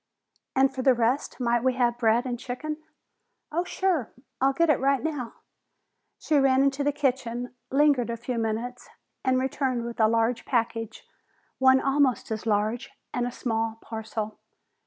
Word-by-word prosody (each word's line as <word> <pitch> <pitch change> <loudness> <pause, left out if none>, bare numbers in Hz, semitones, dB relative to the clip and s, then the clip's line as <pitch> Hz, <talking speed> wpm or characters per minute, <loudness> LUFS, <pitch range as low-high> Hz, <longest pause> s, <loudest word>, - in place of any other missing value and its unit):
"And 270 0 +4
for 265 - -3
the 255 -1 +5
rest 240 +5 0
might 240 -1 +1
we 260 0 +3
have 240 -1 +1
bread 230 +1 +3
and 245 -2 -3
chicken?" 300 +6 -4 0.7
"Oh, 340 +3 0
sure! 360 - 0 0.3
I'll 270 +1 +4
get 325 +3 +3
it 290 - +2
right 275 0 +2
now!" 290 -7 -3 0.8
She 300 -3 +2
ran 270 0 +4
into 275 +1 +1
the 290 - +2
kitchen, 250 -4 -1 0.2
lingered 275 -4 +3
a 235 - -2
few 240 +1 -3
minutes, 230 +3 -3 0.3
and 260 -1 +2
returned 260 -2 -1
with 235 0 -6
a 220 - +6
large 230 +1 +1
package, 225 -3 -2 0.5
one 260 0 +6
almost 275 -3 +1
as 220 +1 -3
large, 220 +5 0 0.2
and 245 -1 0
a - - -4
small 225 -2 -2
parcel. 220 -1 -5
250 Hz, 160 wpm, -26 LUFS, 230-270 Hz, 0.8 s, a